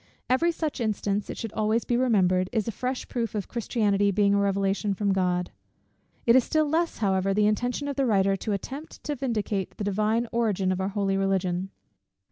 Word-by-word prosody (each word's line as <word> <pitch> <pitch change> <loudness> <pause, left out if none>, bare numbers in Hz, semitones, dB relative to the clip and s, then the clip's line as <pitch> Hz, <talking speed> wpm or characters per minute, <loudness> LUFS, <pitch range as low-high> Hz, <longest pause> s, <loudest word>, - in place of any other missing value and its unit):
Every 335 +7 +3
such 310 -5 -3
instance, 210 -2 -1
it - - -5
should 225 -3 -5
always 220 +2 +1
be 240 - 0
remembered, 185 -7 +2
is 220 -3 -1
a - - 0
fresh 255 +4 -3
proof 230 -3 -3
of 205 - -2
Christianity 205 -4 +1
being 200 0 +3
a 200 - +3
revelation 200 0 0
from 200 0 +1
God. 180 -1 0 0.7
It 235 - +6
is 260 - +6
still 310 +2 +1
less, 330 +3 0
however, 195 -2 +1
the 210 0 +3
intention 245 +6 0
of 280 - -4
the 270 -2 +2
writer 195 -3 +3
to 210 +3 -4
attempt 270 +10 -6
to 295 - -2
vindicate 215 -7 -2
the - - -3
Divine 215 +4 +1
origin 205 -5 +1
of 185 0 -1
our 190 - -1
Holy 195 -1 0
Religion. 190 -1 0
210 Hz, 195 wpm, -26 LUFS, 195-240 Hz, 0.7 s, It